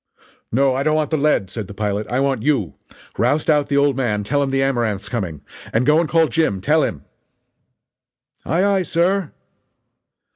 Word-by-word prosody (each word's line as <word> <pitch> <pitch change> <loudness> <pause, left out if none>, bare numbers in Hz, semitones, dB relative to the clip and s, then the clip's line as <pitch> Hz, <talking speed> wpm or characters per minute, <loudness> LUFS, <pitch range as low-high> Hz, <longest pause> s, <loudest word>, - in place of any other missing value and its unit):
"No, 135 +3 +2
I 130 - -1
don't 155 +2 +1
want 155 0 -1
the - - +2
lead," 140 -10 +1
said 110 -3 -5
the 100 - -10
pilot, 105 0 -2
"I 125 - -1
want 135 -4 0
you. 120 - 0 0.5
Roust 145 +7 +2
out 150 -1 +1
the 140 - +1
old 140 -1 +3
man 110 -6 -1
tell 145 +7 0
him 140 - 0
the 135 0 +1
Amaranth's 115 -7 -1
coming. 95 - -4 0.3
And 115 +3 +1
go 150 +2 +4
and 165 -2 -1
call 165 -1 +3
Jim 155 -14 0
tell 150 +10 +2
him." 70 - -3 1.4
"Aye 170 +4 0
aye, 200 -1 +2
sir!" 180 0 0
135 Hz, 185 wpm, -20 LUFS, 110-155 Hz, 1.4 s, go